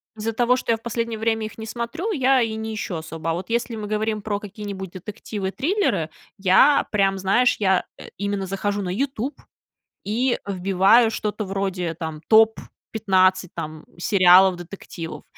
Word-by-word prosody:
Из-за 220 +1 -3
того, 240 +2 +3
что 255 - -1
я 225 - +2
в - - -25
последнее 230 -1 -2
время 225 0 0
их 215 - -9
не 220 - -5
смотрю, 235 - -4
я 265 -6 +3
и 225 -2 -1
не 220 0 -4
ищу 205 -4 -4
особо. 160 0 -5
А - - 0
вот 180 +4 -6
если 235 0 -1
мы 215 -1 -5
говорим 215 0 -1
про 205 -2 -2
какие-нибудь 200 -2 -7
детективы, 195 +1 -6
триллеры, 300 - 0 0.3
я 195 +10 +5
прям, 195 -2 +2
знаешь, 200 +7 +3
я, 190 -3 +2
э, - - -10
именно 200 -1 -2
захожу 200 +2 -2
на 185 - -3
"Ютуб" 265 +5 -3 0.6
и 240 +4 0
вбиваю 195 +4 +4
что-то 215 -1 -3
вроде 190 -4 -3
там 160 -2 -6
"Топ-15 195 -4 +2
там 155 -2 -6
сериалов-детективов". 180 -2 +2
205 Hz, 160 wpm, -23 LUFS, 185-225 Hz, 0.6 s, я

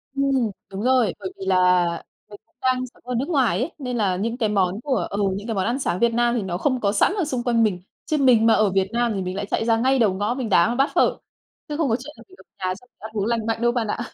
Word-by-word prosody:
Ừm, 275 0 +1 0.5
đúng 195 +1 -5
rồi, 250 -6 +3
bởi 190 -2 -5
vì 190 - -6
là 180 -1 +4 0.4
mì 205 - -10
cũng - - -42
đang 255 0 +1
sống - - -24
ở 250 0 -3
nước 265 +7 -2
ngoài 270 -8 +2
ấy, 285 +7 -2
nên 250 -4 -4
là 195 -5 +1
những 225 +6 -2
cái 225 -4 0
món 195 0 0
của 270 0 -1
ừ, 200 - -3 0.2
những 205 +3 -6
cái 225 - -2
món 190 -1 0
ăn 240 +4 -1
sáng 185 -9 -1
Việt 235 +1 +2
Nam 240 +1 +2
thì 235 - 0
nó 185 -3 -3
không 255 +3 0
có 200 - +2
sẵn 210 - +2
ở 370 - +1
xung 255 -5 -3
quanh 235 -2 +2
mình, 190 -5 0 0.2
chứ 310 - 0
mình 250 -5 +4
mà 225 - +6
ở 215 -2 +3
Việt 190 0 +1
Nam 240 0 +1
thì 195 - -2
mình 185 0 -4
lại 200 +1 -3
chạy 220 - -1
ra 225 -1 +3
ngay 260 +3 +2
đầu 215 -5 +3
ngõ 205 +4 -1
mình 250 -3 -4
đá 180 +1 +4
một 235 - -1
bát 275 +3 +2
phở, - - +3 0.5
chứ 295 - -3
không 310 -4 +1
có 225 - +2
chuyện 295 +4 -10
là - - -13
mì 375 - -17
ở - - -16 0.2
nhà 185 - 0
xong 250 +5 -19
mình - - -72
ăn 220 +1 -8
uống 205 -2 -1
lành 230 -1 -1
mạnh 225 0 -2
đâu 240 0 +3
bạn 240 -2 -1
ạ. 210 - -3
230 Hz, 310 wpm, -23 LUFS, 200-255 Hz, 0.5 s, mà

